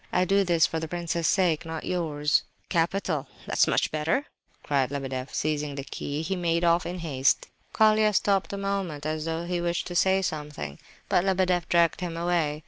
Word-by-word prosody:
I 180 +1 +2
do 195 +2 +3
this 170 -3 +3
for 160 - -2
the 160 - -4
prince's 170 -1 -2
sake, 175 -5 +2
not 160 -1 -5
yours." 150 -5 +1 0.3
"Capital, 165 -3 0 0.2
that's - - +2
much - - +1
better!" 155 - 0 0.4
cried 135 -3 +1
Lebedeff, 135 -2 -4
and - - -10
seizing 150 -1 -1
the 140 - -4
key 145 +2 -4
he 190 +4 -1
made 170 -1 0
off 170 0 +3
in 180 +1 -4
haste. 135 -3 +1 0.2
Colia 215 0 +4
stopped 195 -1 +1
a 200 - -4
moment 195 -7 -3
as 155 0 -2
though 165 +1 -2
he 175 0 -2
wished 170 0 -1
to 175 - -6
say 190 +2 +3
something; 150 - -4 0.3
but 175 - +2
Lebedeff 185 -2 +1
dragged 170 +2 +3
him 170 -2 -3
away. 165 -3 0
170 Hz, 190 wpm, -27 LUFS, 150-180 Hz, 0.4 s, Colia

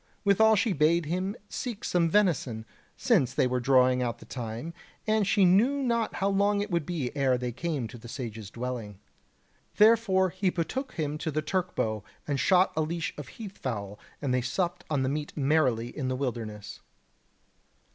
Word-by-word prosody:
Withal 220 +2 +5
she 215 0 +1
bade 160 +2 +3
him 185 +6 -2
seek 240 +1 -5
some 170 -7 +2
venison, 160 - +1 0.3
since 180 - +2
they - - +3
were 125 0 0
drawing 125 0 +4
out 120 -1 -1
the - - -14
time, 120 +6 -6 0.3
and 215 -2 +2
she 200 -1 +4
knew 240 +10 +4
not 235 -3 0
how 195 - 0
long 200 +1 +2
it 205 0 -3
would 170 -3 0
be 150 -8 -3
ere 135 -3 +2
they 125 0 -3
came 145 -2 -3
to 120 +1 -11
the 120 - -11
Sage's 115 -5 -6
dwelling. 120 -4 -5 0.8
Therefore 210 -4 +5
he 185 +1 0
betook 220 - -3
him 150 -2 -3
to 160 - -2
the 155 0 -1
Turk 185 +3 -2
bow, 110 -2 -1 0.2
and 140 -2 -1
shot 185 +3 +4
a 160 - +1
leash 165 +1 -2
of 150 -3 -8
heath 205 - -10
fowl, 105 -5 -4 0.2
and 135 -3 0
they 125 - +2
supped 170 +8 -2
on 145 -4 +1
the - - 0
meat 145 +2 -3
merrily 135 -5 +1
in 135 -4 -2
the 130 - -1
wilderness. 115 -6 -5
155 Hz, 185 wpm, -28 LUFS, 125-190 Hz, 0.8 s, Withal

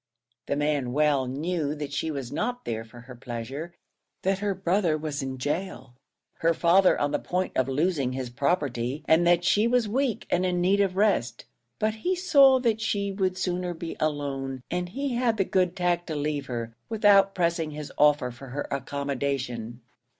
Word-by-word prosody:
The - - 0
man 145 -4 0
well 145 -3 +2
knew 150 +2 -2
that 145 -1 -6
she 160 +3 -1
was 135 -5 -5
not 245 0 -3
there 115 -1 -3
for 120 +2 -14
her 125 +1 -11
pleasure 125 +7 -6 0.5
that 190 0 +1
her 205 -1 -1
brother 180 -3 +1
was 150 -1 -4
in 135 -1 -4
gaol, 145 -1 -4 0.5
her 165 0 +2
father 180 +3 +4
on 145 0 0
the 145 - 0
point 185 +1 -2
of 130 - +2
losing 140 -2 0
his 130 -2 -4
property, 140 -2 -1
and 165 +2 +4
that 175 0 +4
she 210 +2 +3
was 240 -2 +2
weak 250 +1 -1
and 180 - +2
in 180 -1 0
need 195 +3 +3
of 190 -2 0
rest; 190 - +1 0.3
but 215 0 0
he 355 +13 -1
saw 280 -7 +6
that 225 -3 +1
she 200 -2 -1
would 190 -2 -1
sooner 180 -1 -2
be 165 0 -6
alone, 135 -4 -2
and 180 0 -2
he 275 +6 -3
had 235 -2 +1
the 195 - +2
good 180 -1 +1
tact 175 -1 0
to 160 - -3
leave 145 -1 -2
her, 115 -2 -5
without 205 -3 +4
pressing 170 -3 0
his 150 -1 -7
offer 145 -4 +3
for 130 +3 -11
her 140 +3 -4
accommodation. 135 -4 -3
160 Hz, 185 wpm, -26 LUFS, 135-190 Hz, 0.5 s, saw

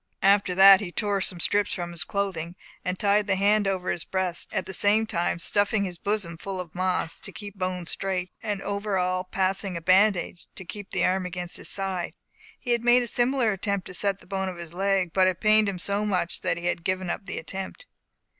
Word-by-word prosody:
After 195 -2 +4
that 195 +1 +9
he 185 -4 -5
tore 200 +1 -1
some 180 -1 -1
strips 205 +4 +2
from 175 -1 -4
his 170 - 0
clothing, 185 -4 -3 0.3
and 185 0 -2
tied 205 +1 +2
the 195 - +2
hand 205 +1 +3
over 185 -2 -1
his 170 - -3
breast, 185 -2 -2
at 185 - -1
the 190 - -6
same 210 +4 +3
time 175 -5 -1
stuffing 205 +4 +1
his 180 -3 -5
bosom 200 -5 -2
full 190 +2 -5
of 175 -3 -7
moss, 180 -2 -1
to - - -7
keep 205 -2 -9
the 195 - -23
bone 185 -1 -2
straight, 185 +1 -2
and 205 -2 -3
over 200 0 -2
all 185 0 0
passing 190 0 0
a - - -3
bandage, 185 0 +2
to 190 - -8
keep 205 +2 -8
the - - +1
arm 185 0 +1
against 180 -1 -5
his - - -6
side. 190 -3 -3 0.4
He 245 - -3
had 235 -1 +1
made 245 +1 +5
a - - -3
similar 240 0 +1
attempt 200 0 -2
to - - -8
set 200 +1 +1
the - - -16
bone 190 0 -2
of 180 - -8
his 170 -1 -9
leg, 190 -2 0
but 190 -1 +4
it 185 -2 0
pained 215 -1 +4
him 195 - -4
so 200 +4 0
much 185 -5 -1
that - - 0
he 175 - -6
had 175 -1 -1
given 185 0 -1
up 195 - -6
the - - -4
attempt. 190 - -6
190 Hz, 230 wpm, -26 LUFS, 180-205 Hz, 0.4 s, that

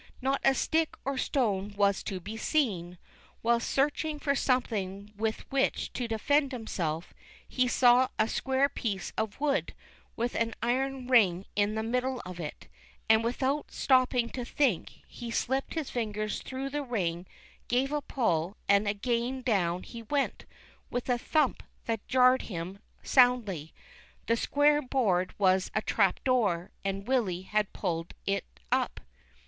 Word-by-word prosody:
Not 270 +1 0
a 270 - +4
stick 320 +2 +1
or 275 0 -1
stone 205 -7 0
was 200 -1 +3
to 190 - -3
be 205 +5 -7
seen. 200 - 0 0.5
While 235 +1 +3
searching 295 +5 0
for 285 -1 0
something 210 -7 -1
with 220 +1 -1
which 270 0 0
to 245 - -2
defend 280 +6 +1
himself, 175 - -3 0.3
he 255 -1 +1
saw 245 +1 +5
a 215 - +3
square 265 +3 +1
piece 205 -9 -4
of 220 +1 -3
wood 285 -1 0 0.4
with 240 +1 -1
an 230 -1 -1
iron 260 +2 -1
ring 200 -7 +4
in 205 +1 +1
the 220 - -1
middle 250 +2 -1
of 180 -1 -8
it, 155 -3 -7 0.4
and 220 0 +6
without 260 +5 -1
stopping 255 -2 +2
to 250 - -5
think 245 - -1
he 240 -1 -8
slipped 265 +6 -1
his 315 -4 -3
fingers 215 -3 -2
through 265 +1 -5
the 295 +1 -1
ring, 185 -9 -2 0.4
gave 260 +3 +1
a 295 0 0
pull, 185 - -1
and 200 +1 +4
again 240 +5 -1
down 180 -7 +1
he 235 - -9
went, 275 +5 -1 0.4
with 245 +1 -3
a 245 -1 +2
thump 300 0 +1 0.2
that 225 -2 -3
jarred 255 0 +5
him 185 0 -6 0.2
soundly; 230 - +3 0.5
the 230 - +2
square 295 +5 +3
board 220 -10 +1
was 190 -2 +3
a 215 - +2
trap 195 -4 +2
door, 205 -10 +1
and 195 +1 -3
Willy 205 -9 0
had 210 +1 0
pulled 165 -3 -3
it 200 0 0 0.3
up. - - +1
235 Hz, 150 wpm, -29 LUFS, 200-260 Hz, 0.5 s, and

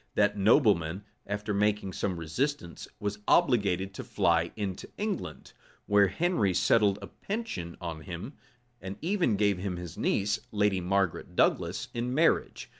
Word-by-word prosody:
That 105 0 +3
nobleman, 100 - +3 0.2
after 105 +1 -2
making 105 -1 +1
some 95 -3 -2
resistance, 85 - -3
was 105 0 -3
obliged 100 - +3
to - - -6
fly - - +1
into 100 -4 -4
England, 190 - -4 0.3
where 100 -1 +5
Henry 100 - +1
settled 100 0 +3
a - - -6
pension 195 - -5
on 85 -3 -5
him, 90 - -7 0.5
and 95 +1 -6
even 175 - +2
gave 100 -2 +2
him 95 -2 -3
his 85 -3 -8
niece, 100 +2 +1
lady 105 -3 +1
Margaret 95 -1 -1
Douglas, - - +1
in 120 +2 -2
marriage. 165 +3 +1
100 Hz, 140 wpm, -29 LUFS, 90-115 Hz, 0.5 s, where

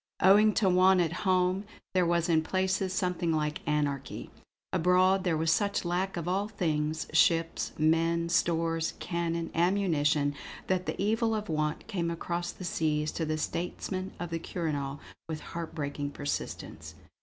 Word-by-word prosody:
Owing 210 +3 +6
to 200 - +2
want 185 +1 +5
at 170 -2 +1 0.2
home, 185 +1 +2 0.3
there 180 -2 +3
was 170 -1 +2
in 160 -2 +3
places 190 +2 0
something 180 -3 0
like 150 -1 -1
anarchy; 145 -2 -2 0.4
abroad 185 +2 +3
there 175 -4 +1
was 160 0 +2
such 200 +2 +1
lack 180 +2 -1
of 170 0 -4
all 195 +3 0
things, 155 -6 -1
ships, 165 0 +2
men, 165 +2 +2
stores, 165 -1 +1
cannon, 170 -1 -2
ammunition, 155 -5 +2 0.3
that 185 -1 -1
the - - -3
evil 225 +2 +1
of 215 -1 -4
want 155 -1 -1
came 175 -6 -2
across 175 +1 -3
the 185 - -9
seas 155 -2 0
to 165 - -2
the 155 0 -1
statesmen 185 +3 -3
of 175 -1 -5
the 165 - -1
Quirinal 145 -5 -3 0.3
with 155 -1 -4
heart 165 -1 -5
breaking 145 -2 -3
persistence. 145 0 -5
170 Hz, 155 wpm, -29 LUFS, 155-185 Hz, 0.4 s, Owing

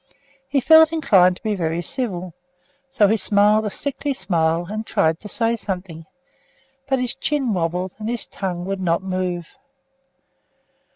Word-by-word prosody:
He 280 0 +2
felt 320 +2 +7
inclined 195 - +4
to - - -18
be 215 -2 0
very 170 -2 -2
civil, 185 -7 -4 0.6
so 245 -6 +3
he 220 +3 +2
smiled 210 +1 +3
a - - -1
sickly 285 +4 -3
smile 165 -5 0
and 215 +3 -4
tried 160 -6 +1
to 210 - -10
say 230 +3 0
something, 180 -6 -6 0.8
but 265 - +2
his 250 -1 0
chin 275 -7 -1
wobbled, 180 +1 -2
and 215 +1 -4
his 240 -2 -2
tongue 180 -2 -5
would 195 0 -3
not 170 0 0
move. 185 -3 -3
195 Hz, 155 wpm, -21 LUFS, 175-235 Hz, 0.8 s, felt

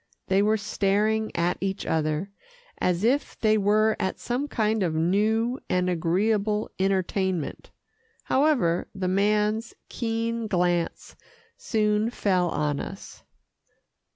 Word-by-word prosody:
They 195 +1 +4
were 215 +1 +3
staring 215 +1 0
at 170 +1 0
each 195 +1 -2
other, 155 +4 -1 0.5
as 180 +1 0
if 265 +6 0
they 215 -1 +3
were 215 +1 +3
at 190 - -1
some 250 +4 -2
kind 220 -4 0
of 170 -4 0
new 215 - +1
and 180 0 +1
agreeable 205 +5 0
entertainment. 190 -3 -1 0.5
However, 260 - +2
the 190 -1 -2
man's 210 +4 +1
keen 230 -1 -2
glance 175 -3 -1 0.4
soon 215 0 0
fell 185 -6 +1
on 150 -2 -1
us. - - -8
205 Hz, 115 wpm, -26 LUFS, 180-220 Hz, 0.5 s, They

